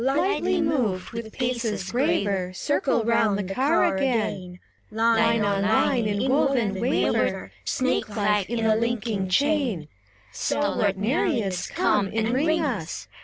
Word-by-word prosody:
SIRENS. 270 +2 +1
Lightly 360 0 +1
moved, 245 - -1
with 230 -1 -6
paces 235 -6 -2
graver, 200 - 0
Circle 265 +2 0
round 225 -3 +2
the 205 - -2
car 260 - +1
again; 205 -6 -1 0.3
Line 225 0 +2
on 200 -1 0
line 220 +3 +2
inwoven, 240 -1 +1
waver 250 +3 0
Snake 260 -3 -1
like 210 -2 +1
in 230 -1 -1
a 220 -1 +4
linking 220 -4 -1
chain, 265 - +1 0.2
— 100 +2 -31
Stalwart 205 -9 0
Nereids, 205 - -1
come, 200 -1 +1
enring 260 +10 0
us. 215 - -4
225 Hz, 125 wpm, -24 LUFS, 200-265 Hz, 0.3 s, a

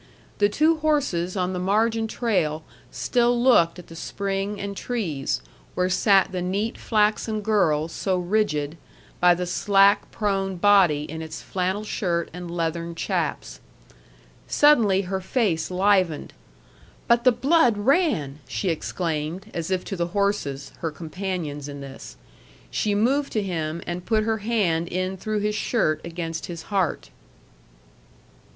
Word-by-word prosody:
The 205 0 +4
two 315 +8 +3
horses 275 - 0
on 185 0 0
the 180 - -3
margin 220 +4 +1
trail 180 -10 -1 0.3
still 240 -1 +1
looked 240 -10 +4
at 180 - -10
the 165 - -12
spring 195 +3 -3
and 200 0 -4
trees, 175 - -2 0.3
where 180 0 +1
sat 195 0 +4
the 185 -1 -3
neat 200 +6 -1
flaxen 215 0 +1
girl 170 -8 +2
so 185 +3 -1
rigid 175 -5 -1 0.4
by 175 0 +6
the 180 +1 -3
slack 195 +3 +3
prone 195 -3 -1
body 180 -6 +4
in 160 +2 -6
its 160 0 -7
flannel 190 +2 -2
shirt 175 -5 -1
and 180 0 -7
leathern 170 0 -3
chaps. - - -2 0.9
Suddenly 230 -10 +4
her 190 +1 -3
face 185 -5 0
livened. 185 -4 +1 0.7
"But 235 0 +4
the 255 - +6
blood 245 -1 +3
ran!" 205 - +1
she 190 - -2
exclaimed, 165 +3 -3
as 165 0 -3
if 185 -1 -1
to 195 - -4
the 170 -2 -1
horses, 145 -9 -1
her 165 - -2
companions 160 -3 -5
in 140 0 -7
this. 135 -1 -10 0.5
She 210 -1 0
moved 270 +7 +1
to 215 - 0
him, 165 -3 -3
and 175 +1 -4
put 215 +1 +1
her 220 0 0
hand 200 -7 0
in 185 +2 -2
through 215 +2 -2
his 210 +1 0
shirt 155 -9 0
against 165 -1 -5
his 170 -2 -7
heart. 190 -5 0
190 Hz, 145 wpm, -24 LUFS, 170-215 Hz, 0.9 s, by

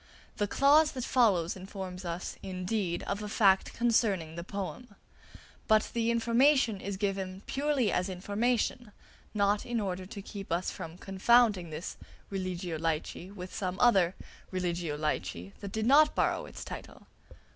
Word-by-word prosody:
The 205 - +1
clause 295 +7 +5
that 255 -3 -4
follows 195 -10 +3
informs 185 -1 -7
us, 170 +1 -4
indeed, 185 -1 -2
of 200 +1 -3
a 210 - -5
fact 195 -2 +4
concerning 215 -9 +1
the 170 +1 -6
poem; 200 +4 -6 0.7
but 215 -1 +3
the 230 -1 +1
information 235 -1 +3
is 200 0 -4
given 195 -1 -2
purely 275 -5 +1
as 180 +2 0
information, 210 +4 -1 0.4
not 205 0 +2
in 240 -2 -2
order 185 -2 -3
to 200 0 -7
keep 200 -2 -8
us 175 +2 0
from 165 +1 -8
confounding 195 -1 +3
this 155 +2 -6 0.3
"Religio 180 -3 -3
Laici" 165 +2 -2
with 185 -2 -8
some 185 -1 -3
other 190 -7 +4 0.3
"Religio 175 -4 -2
Laici" 90 - -3
that 200 - -7
did 220 0 -1
not 295 +5 +6
borrow - - +1
its - - -8
title. - - -9
195 Hz, 145 wpm, -30 LUFS, 180-230 Hz, 0.7 s, not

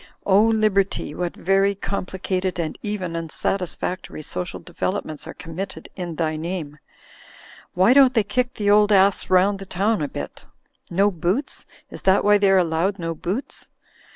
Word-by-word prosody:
O 195 +1 +5
Liberty, 215 -7 +1
what 175 +1 -3
very 195 +2 +2
complicated 185 -1 -3
and 160 -2 -2
even 190 -5 -3
unsatisfactory 175 0 -3
social 180 +4 -4
developments 175 -3 -4
are - - -8
committed 180 +3 -7
in 175 -3 -5
thy 155 -1 -1
name! 155 -3 -5 1.0
Why 190 +7 +5
don't 265 -2 +6
they 220 - +4
kick 250 +4 -1
the 205 -1 +1
old 210 0 +5
ass 195 0 +4
round 190 +2 +3
the 195 - -9
town 200 +2 0
a 145 - 0
bit? 70 - -7 0.4
No 200 +4 +3
boots? 180 - -2 0.2
Is - - -8
that 190 +1 +3
why 205 0 +5
they're 195 -1 +4
allowed 175 +3 +1
no 165 -2 -3
boots? 185 - -5
190 Hz, 155 wpm, -22 LUFS, 170-205 Hz, 1.0 s, don't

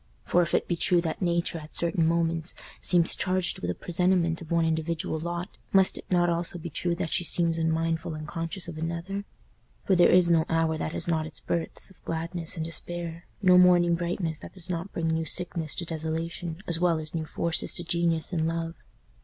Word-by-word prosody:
For 175 - +3
if 170 - +1
it - - +1
be 175 - 0
true 175 +1 +3
that 165 +2 -3
Nature 170 -1 0
at 155 0 -11
certain 170 -1 +2
moments 165 0 0 0.3
seems 175 -2 +4
charged 185 0 0
with 90 - -3
a 90 - -1
presentiment 175 -1 +1
of 165 - -10
one 170 -1 +2
individual 160 0 -1
lot 175 +3 -5 0.2
must 190 -1 +5
it - - -4
not 175 -1 +3
also 170 +1 -1
be 170 -1 -7
true 175 +3 0
that 170 -2 -3
she - - +1
seems 165 -1 +3
unmindful, 165 0 0
unconscious 165 +4 -5
of 165 -2 -7
another? 170 +5 -4 0.6
For 190 - +3
there 175 - +6
is 180 -1 +6
no 165 -2 +4
hour 165 -1 +2
that 155 0 -3
has 170 - -1
not 160 -2 0
its 155 - -3
births 170 +3 -3
of 190 - -22
gladness 165 +1 -2
and 160 - -2
despair, 170 +1 -5 0.2
no 180 -1 +7
morning 175 -1 +5
brightness 170 -2 -2
that - - -11
does 185 -1 -4
not 175 +3 -4
bring 165 -1 -2
new 160 0 0
sickness 165 -1 -3
to 170 - -3
desolation 165 +2 -4
as 170 -1 +2
well 175 -2 +3
as 155 -1 -4
new 160 -2 -2
forces 170 +1 0
to 175 - +3
genius 170 0 0
and 160 -2 +1
love. 165 0 -2
170 Hz, 205 wpm, -27 LUFS, 160-175 Hz, 0.6 s, no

